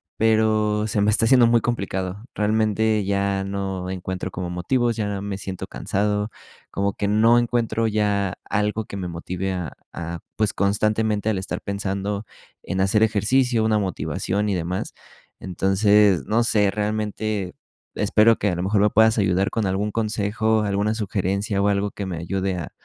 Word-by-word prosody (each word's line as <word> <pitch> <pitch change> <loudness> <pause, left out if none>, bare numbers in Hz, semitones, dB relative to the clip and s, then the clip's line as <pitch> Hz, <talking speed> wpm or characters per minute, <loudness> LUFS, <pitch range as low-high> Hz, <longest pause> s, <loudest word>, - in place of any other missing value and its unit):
pero 110 -1 +2
se 105 - -1
me 105 - +3
está 105 +1 +2
haciendo 120 0 +6
muy 120 0 +4
complicado. 100 -4 -3
Realmente, 110 0 +1
ya 100 0 0
no 95 -2 -3
encuentro 95 0 -4
como 90 0 -4
motivos, 120 +7 0
ya 105 -2 -2
me 100 -1 -4
siento 95 -2 -6
cansado, 105 +1 -1 0.4
como 100 0 0
que 100 - -2
no 115 +3 +5
encuentro 115 -1 0
ya 100 -3 0
algo 105 +2 -1
que - - -8
me 90 -2 -4
motive 90 +3 -4
a 90 -6 -4 0.2
a, 85 0 -5 0.2
pues, 110 -2 +1
constantemente 105 +1 +1
el 105 - 0
estar 95 +1 -4
pensando 100 +1 -3 0.4
en 95 - -2
hacer 100 +3 +2
ejercicio, 110 +3 +2
una 110 -1 +2
motivación 100 +2 -2
y - - +1
demás. 90 +2 -3 0.5
Entonces, 95 +1 +3
no 115 +2 +2
sé, 105 -3 +2
realmente 105 -2 -2 0.4
espero 115 +1 +4
que 105 - 0
a 90 - -1
lo 85 - -3
mejor 100 +2 +2
me 105 - +4
puedas 110 +1 +4
ayudar 95 -1 +2
con 115 -2 -1
algún 100 +2 -1
consejo, 110 0 0
alguna 100 +1 0
sugerencia, 100 -1 -1
o 100 - +3
algo 100 0 0
que 100 - -5
me 90 -3 -4
ayude 95 +3 -2
a, 85 -4 -6
105 Hz, 165 wpm, -23 LUFS, 95-110 Hz, 0.5 s, haciendo